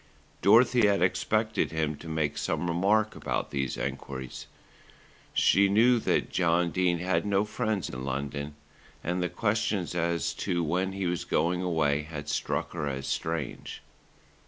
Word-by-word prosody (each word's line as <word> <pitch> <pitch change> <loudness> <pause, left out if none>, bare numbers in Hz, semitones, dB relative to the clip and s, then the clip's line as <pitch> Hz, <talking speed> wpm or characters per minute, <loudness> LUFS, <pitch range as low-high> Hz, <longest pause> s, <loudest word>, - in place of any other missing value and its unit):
Dorothy 115 +3 +5
had 100 -3 +2
expected 110 +4 +1
him 80 -1 -1
to 80 - -11
make 80 -2 -1
some 90 - -2
remark 100 +6 +2
about - - -3
these 70 -2 -2
enquiries. 65 -1 -5 0.8
She 100 +1 +4
knew 115 +4 +5
that - - 0
John 85 -1 +2
Dene 90 -1 +1
had 85 -1 0
no 100 0 +1
friends 110 -3 -2
in 65 0 -6
London, 70 +2 -4 0.5
and 90 +2 -1
the 90 - 0
questions 100 -1 -1
as 85 -3 0
to 85 -1 0
when 90 +4 0
he 95 -1 -3
was 90 -1 -1
going 90 +2 0
away 80 -5 +1
had 75 -1 -7
struck - - -2
her 80 -4 -3
as 65 -1 -3
strange. 80 -3 -4
85 Hz, 150 wpm, -28 LUFS, 75-100 Hz, 0.8 s, Dorothy